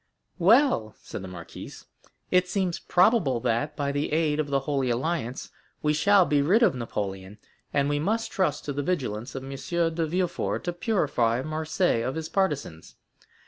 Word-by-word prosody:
"Well," 190 - +4
said - - -8
the 95 - -7
marquise, 90 -2 -10 0.5
"it 180 0 +4
seems 185 -3 -1
probable 180 - +3
that, 125 +5 0
by 140 -1 -1
the 145 +1 -2
aid 155 -1 +1
of 155 - 0
the 140 -1 0
Holy 135 -2 -1
Alliance, 130 0 -2 0.3
we 150 0 +3
shall 195 +4 +5
be 145 -3 +2
rid 195 +12 +4
of 200 - +5
Napoleon; 100 -5 -5 0.3
and 140 -1 +1
we 145 0 0
must 220 +8 -1
trust 170 -7 0
to 145 - -3
the 145 - -2
vigilance 135 - -3
of 135 - -5
M. 135 - -7
de 165 +3 -1
Villefort 180 +2 -1
to 175 - -2
purify 140 - 0
Marseilles 155 -4 0
of 130 - -3
his 160 -1 -4
partisans. 145 - -2
150 Hz, 170 wpm, -26 LUFS, 130-175 Hz, 0.5 s, shall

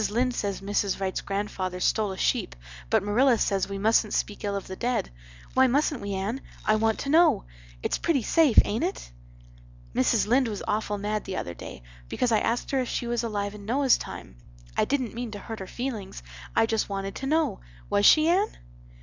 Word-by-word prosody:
Lynde 245 +4 +1
says 200 -4 -2
Mrs. 200 0 -1
Wrights 190 -1 -2
grandfather 195 -2 -3
stole 210 +2 +1
a 190 - -6
sheep - - 0 0.3
but - - +3
Marilla 235 +5 +3
says 195 -2 0
we 195 - -4
mustent 215 +1 +2
speak 205 - -2
ill 200 -1 -1
of 200 - -4
the 190 - -7
dead. 245 - -1 0.4
Why 260 0 +5
mustent 285 +1 +1
we, 200 -1 -3
Anne? 210 +8 -3 0.2
I 215 - +4
want 220 0 +1
to 275 - -4
know. 330 +3 +5 0.4
It's - - 0
pretty 300 -8 +1
safe, 310 -1 +3
ain't 210 +3 -1
it? - - -3 0.8
"Mrs. 205 - +2
Lynde 250 +4 +3
was 210 -3 -4
awful 210 -1 -1
mad 210 +1 -2
the 190 - -4
other 85 - -4
day 65 - -10 0.3
because 250 -1 0
I 220 - +4
asked 235 +1 -1
her 270 - +2
if 250 - -3
she - - -2
was 235 0 0
alive 205 -3 -2
in 210 -1 -10
Noah's 260 +4 +3
time. - - -9 0.4
I - - +2
dident 260 -4 -1
mean 240 0 -4
to - - -5
hurt 225 +2 -7
her 190 - -6
feelings. 225 - -5 0.3
I 225 - +5
just 225 -1 -1
wanted 195 0 -3
to 270 - -4
know. 315 +3 +1 0.3
Was 205 0 +5
she, 310 0 +6
Anne? 380 +5 +2
215 Hz, 205 wpm, -26 LUFS, 200-250 Hz, 0.8 s, she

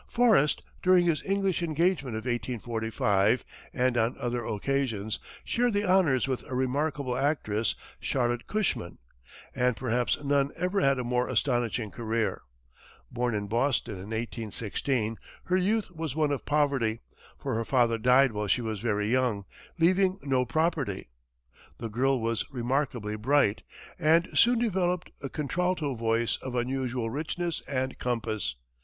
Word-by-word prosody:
Forrest, 220 - +3 0.2
during 180 -1 +5
his 165 -3 +1
English 195 -2 +1
engagement 160 -6 0
of 110 - -5
1845, 115 -3 0 0.3
and 125 -1 +1
on 115 +1 +1
other 120 0 -2
occasions, 110 -2 -1 0.3
shared 245 -1 +1
the 205 0 +1
honors 170 -9 +3
with 130 -2 -2
a 130 - -3
remarkable 135 0 0
actress, 125 -6 0 0.2
Charlotte 120 -2 -1
Cushman. 205 - -1 0.6
And 125 -2 +1
perhaps 120 0 0
none 140 0 +2
ever 185 +2 0
had 135 0 +3
a 125 - -2
more 125 +1 0
astonishing 120 -4 0
career. 115 -1 -1 0.7
Born 120 -2 -1
in 105 -1 -2
Boston 120 +2 0
in 95 +1 -8
1816, 115 +1 -2 0.2
her 185 - +1
youth 205 +2 +1
was 160 -5 -4
one 155 -2 +2
of 140 - -3
poverty, 135 -7 +1 0.4
for - - -3
her 115 +1 0
father 115 -2 +2
died 125 +3 +5
while 105 -1 -3
she 120 - +2
was 110 -2 -3
very 105 -2 0
young, 120 -4 +1 0.3
leaving 185 +3 +3
no 130 -2 +1
property. 140 - -1 0.7
The 115 - -5
girl 130 +4 +1
was 115 0 0
remarkably 120 -4 -1
bright, 115 -2 +2 0.4
and 165 +2 +4
soon 240 +1 +5
developed 185 -6 0
a 135 - -4
contralto 155 +1 -1
voice 115 0 0
of 130 -1 -6
unusual 125 -2 -1
richness 165 +4 -2
and 130 -1 -2
compass. 110 - -2
130 Hz, 140 wpm, -28 LUFS, 115-150 Hz, 0.7 s, during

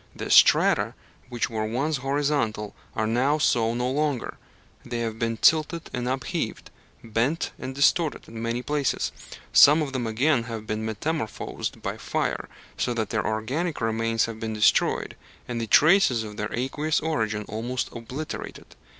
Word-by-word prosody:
The - - -5
strata - - +5 0.3
which 120 -2 -1
were 110 -2 -3
once 140 +7 -1
horizontal 135 -6 -1 0.2
are 110 - 0
now 125 +7 +2
so 115 -6 +2
no 125 +1 -1
longer 145 -2 -1 0.4
they 120 -1 -4
have 115 -1 -3
been 115 -1 -1
tilted 160 +5 +2
and 125 0 -2
upheaved, 130 0 -3 0.3
bent 115 +8 -1
and 130 - -6
distorted, 150 +3 +2
in 115 0 -8
many 115 +2 -2
places. 145 -3 0 0.4
Some 150 +2 +7
of 135 -2 -5
them 125 -3 -2
again 120 +2 +2
have 115 -2 -6
been 110 0 -3
metamorphosed 110 +3 -4
by - - -3
fire, - - -2 0.3
so 120 - 0
that 110 -2 -2
their 110 -3 0
organic 135 +10 -2
remains 115 0 +1
have 115 -1 -7
been 110 -1 -3
destroyed, 105 0 +2 0.3
and 120 -1 -3
the 115 - -3
traces 155 - +5
of 105 -1 -8
their 105 +1 -4
aqueous 145 +5 -1
origin 110 -10 -1
almost 120 +4 -3
obliterated. 130 +6 -7
120 Hz, 155 wpm, -25 LUFS, 110-145 Hz, 0.4 s, Some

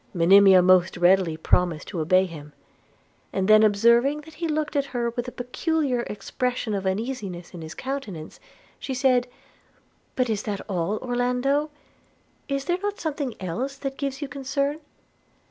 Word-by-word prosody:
Monimia 190 +2 +7
most 185 -1 +4
readily 175 -2 +3
promised 170 0 +1
to 180 - -4
obey 185 +4 +3
him: 150 -4 -10 0.4
– - - -38
and 190 0 -1
then 215 0 +7
observing 235 +7 +4
that 320 +1 -15
he 335 +1 -3
looked 305 -1 -2
at 280 -1 +1
her 235 -1 0
with 240 +1 -4
a - - -5
peculiar 265 +2 -1
expression 245 +3 -3
of 195 -1 -2
uneasiness 195 -4 -4
in 175 - -8
his 160 0 -8
countenance, 225 - -6 0.4
she 265 - -4
said, 250 -1 +2 0.9
'But 255 -1 +1
is 215 -3 -1
that 205 -2 -4
all, 190 +1 -1
Orlando? 250 +4 0 0.8
Is 275 -1 -2
there 350 +4 0
not 410 0 -3
something 285 -6 -3
else 235 +10 -3
that 270 0 -5
gives 275 0 -3
you - - -4
concern?' 280 +2 -2
240 Hz, 160 wpm, -24 LUFS, 190-275 Hz, 0.9 s, Monimia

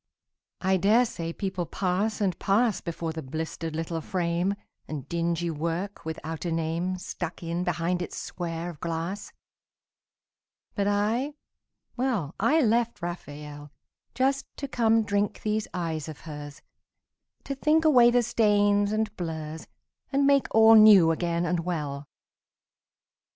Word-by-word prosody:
I 190 0 +2
dare 215 +7 +4
say 165 -7 -5
people 185 -2 -3
pass 200 +4 -1
and 185 -4 0
pass 215 +2 +2
Before 165 -1 -4
the 160 - -5
blistered 160 +3 -5
little 165 0 -3
frame, 175 +2 -1 0.3
And 145 -3 -6
dingy 170 0 -1
work 170 +5 -3
without 160 0 -5
a 175 - -2
name 165 +3 -1
Stuck 180 -1 -6
in 170 +1 -2
behind 175 0 -1
its 175 - -5
square 170 0 -4
of 155 - -15
glass. 170 +4 -4 1.4
But 200 -1 0
I, 220 +8 0 0.6
well, 230 - -1
I 315 +2 +3
left 235 - +1
Raphael 150 -4 -7 0.5
Just 270 +1 +1
to 280 - -4
come 225 -3 +3
drink 205 0 -1
these 215 0 -1
eyes 160 -3 -3
of 155 - -9
hers, 145 -2 -9 0.8
To 275 - -3
think 305 +4 +2
away 250 -6 +7
the 245 0 +3
stains 205 -3 +3
and 215 -1 -1
blurs 160 -2 -5 0.4
And 280 0 +2
make 280 -1 +4
all 225 0 +7
new 210 -6 +8
again 170 +1 -1
and 175 0 0
well. 150 -5 -3
180 Hz, 135 wpm, -27 LUFS, 165-215 Hz, 1.4 s, new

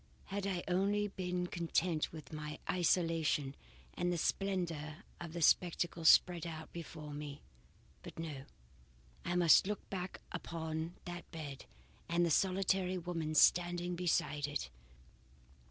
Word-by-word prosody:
Had 200 0 -1
I 180 -3 -1
only 200 +3 +1
been 180 -2 -2
content 170 -1 0
with 160 0 -10
my 150 0 -5
isolation 165 -5 +2 0.4
and 175 0 0
the 175 - 0
splendour 170 -3 -1 0.2
of 170 -2 -7
the 170 -1 -1
spectacle 170 0 +2
spread 175 0 +6
out 160 -1 -7
before 150 -2 -7
me! 145 -1 -7 0.6
But - - -10
no, 150 -5 -5 0.8
I 175 - -1
must 175 +1 +6
look 210 -1 -3
back 185 -1 -4
upon 165 -1 -4
that 175 -1 -7
bed 145 -5 -7 0.4
and 170 +1 +3
the 170 - +1
solitary 185 +1 +2
woman 165 -3 -3
standing 175 +2 +4
beside 150 -4 +1
it! 65 - -4
170 Hz, 130 wpm, -35 LUFS, 155-180 Hz, 0.8 s, spread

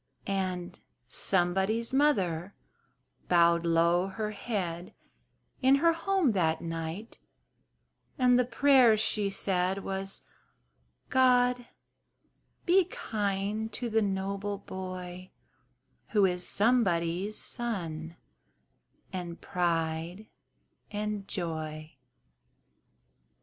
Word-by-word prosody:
And 185 -3 -3 0.3
"somebody's 190 - 0
mother" 195 - +1 0.7
bowed 170 -1 +4
low 170 +2 +3
her 210 +2 -4
head 185 -5 -4 0.7
In 265 +1 +6
her 330 +4 +4
home 370 -4 +1
that 160 -5 +1
night, 165 +6 -6 1.0
and 250 -1 +4
the - - +4
prayer 250 -2 +5
she 210 -1 0
said 190 0 0
Was 195 0 -4 0.9
"God 250 -1 +3 1.0
be 365 +1 +5
kind 210 - -2
to 240 -2 -3
the 225 +1 +3
noble 200 0 -2
boy, 185 -1 -7 0.8
Who 205 -3 +5
is 180 -1 -1
somebody's 195 -4 +1
son, 170 -9 -4 1.0
and 175 -2 -5
pride 170 +1 -2 0.6
and 210 -1 -3
joy!" 155 -3 -4
195 Hz, 85 wpm, -29 LUFS, 175-225 Hz, 1.0 s, In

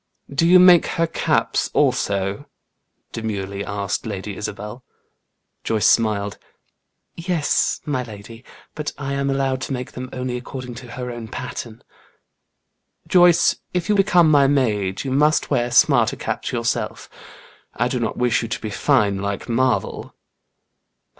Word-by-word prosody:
"Do 165 +4 +2
you 180 +2 +7
make 180 -2 +7
her 165 - +3
caps 165 - 0
also?" 100 0 0 0.6
demurely 100 -3 -4
asked 100 -1 -3
Lady 100 -1 -5
Isabel. 105 +4 -6 0.8
Joyce 110 -2 0
smiled. 105 -3 +1 0.8
"Yes, 170 -3 0
my 145 -4 -1
lady; 115 0 -10 0.3
but 150 -1 -4
I 140 -1 -4
am 140 0 -1
allowed 135 -1 0
to 135 - -3
make 125 -1 -5
them 130 0 -7
only 125 -1 -3
according 125 0 -7
to 120 -2 -11
her 125 -1 -5
own 120 -2 -7
pattern." 120 -2 -7 1.2
"Joyce, 175 -2 +5 0.2
if 180 +2 -1
you - - +4
become 180 -5 +4
my 140 -2 +5
maid, 105 -9 0
you 135 - -4
must 150 +4 +2
wear 120 -3 +1
smarter 120 - +4
caps - - -4
yourself. 115 -1 -2 0.7
I 120 - +1
do 125 0 -2
not 115 - -2
wish 125 -2 +2
you 115 - -4
to 115 - -4
be 110 - -5
fine 105 -5 +2
like 100 0 -4
Marvel." 130 +2 -1
125 Hz, 140 wpm, -21 LUFS, 105-140 Hz, 1.2 s, you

